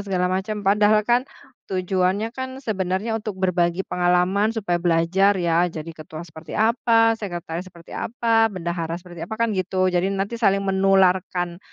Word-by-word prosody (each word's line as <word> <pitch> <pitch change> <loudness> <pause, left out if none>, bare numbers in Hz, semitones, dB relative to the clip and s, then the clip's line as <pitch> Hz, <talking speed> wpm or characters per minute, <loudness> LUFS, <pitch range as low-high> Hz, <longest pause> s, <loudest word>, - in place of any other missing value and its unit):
segala 185 -3 -1
macam. 205 +2 -2
Padahal 210 +2 +4
kan 245 +3 +2 0.4
tujuannya 190 +3 0
kan 260 +2 -7
sebenarnya 205 +1 -1
untuk 215 -2 -5
berbagi 175 0 +1
pengalaman 180 +5 +1
supaya 185 -6 -1
belajar 175 +4 +3
ya 175 -1 +2
jadi 165 -1 -6
ketua 155 0 -9
seperti 160 -1 -11
apa, 225 0 +3
sekretaris 175 -3 -5
seperti 175 -2 -15
apa, 225 -1 +1
bendahara 170 -4 -3
seperti 175 -1 -8
apa, 220 - -5
kan 230 +1 0
gitu. 185 -1 0
Jadi, 180 +1 +1
nanti 200 +4 -3
saling 195 -3 +2
menularkan, 190 -2 +2
190 Hz, 150 wpm, -22 LUFS, 175-215 Hz, 0.4 s, Padahal